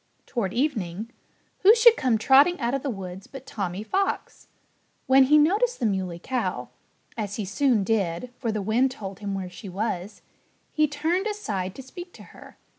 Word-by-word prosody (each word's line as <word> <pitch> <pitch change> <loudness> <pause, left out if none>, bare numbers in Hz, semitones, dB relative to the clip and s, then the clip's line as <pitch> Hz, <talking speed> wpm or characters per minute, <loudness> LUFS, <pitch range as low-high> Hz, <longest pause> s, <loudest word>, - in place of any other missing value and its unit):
Toward 220 -7 -2
evening, 225 - -2 0.5
who 415 +4 +7
should 470 0 +7
come 250 -4 +1
trotting 275 +10 +5
out 235 +1 -1
of 275 - -1
the 280 - -3
woods 190 -3 -7
but 270 -1 -10
Tommy 195 -3 -4
Fox. 390 - -2 0.6
When 265 0 +6
he 300 +3 +5
noticed 410 +11 +2
the 240 - 0
Muley 190 -4 -1
Cow 255 +8 -3 0.5
(as 205 -3 -4
he 215 - -3
soon 220 +2 +2
did, 200 +1 -1
for 230 -3 -1
the 210 -2 -3
wind 235 +6 +2
told 195 -7 -8
him 200 -1 -4
where 190 -1 -4
she 190 +3 -10
was) 195 0 -4 0.5
he 305 -1 +3
turned 320 +7 -1
aside 200 - -3
to 270 - -9
speak 350 +7 -10
to - - -13
her. - - -14
230 Hz, 180 wpm, -25 LUFS, 195-290 Hz, 0.6 s, who